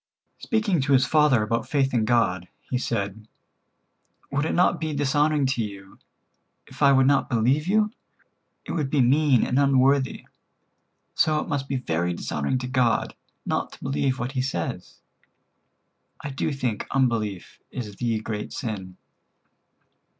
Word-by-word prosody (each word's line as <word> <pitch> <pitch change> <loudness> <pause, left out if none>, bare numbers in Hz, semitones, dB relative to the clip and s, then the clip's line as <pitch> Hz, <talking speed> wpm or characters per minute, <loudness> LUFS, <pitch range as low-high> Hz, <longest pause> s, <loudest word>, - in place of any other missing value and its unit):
Speaking 210 -8 0
to 140 +1 +1
his 130 -1 +5
father 150 -7 +3
about 115 +1 -2
faith 135 -2 +1
in 115 -3 +2
God, 95 -7 +1 0.2
he 125 - -1
said: 105 -3 -3 1.0
"Would 140 +2 0
it - - -1
not 175 -1 +3
be 155 -2 -2
dishonoring 145 +1 +2
to 130 -3 0
you, 100 -2 -9 0.7
if - - -15
I 140 -1 +6
would 135 -1 +5
not 140 0 +2
believe 130 +7 +1
you? 210 +2 +2 0.7
It - - -6
would 150 -5 -1
be 140 -1 +2
mean 135 0 +4
and 130 - +1
unworthy. 135 -1 +2 0.9
So 155 -1 +2
it - - -4
must 140 -4 -2
be 135 - -2
very 85 -8 -1
dishonoring 75 - -2
to 125 0 -4
God 125 -3 +1 0.3
not - - -2
to - - -13
believe 135 -1 0
what 120 +1 -3
He 130 -2 -1
says. 130 -11 -4 1.2
I 145 - -6
do 135 +4 -2
think 125 -6 -3
unbelief 115 -8 -1
is 105 -6 -7
the 115 -3 -1
great 105 -1 -5
sin." 100 -7 -5
130 Hz, 150 wpm, -25 LUFS, 110-140 Hz, 1.2 s, I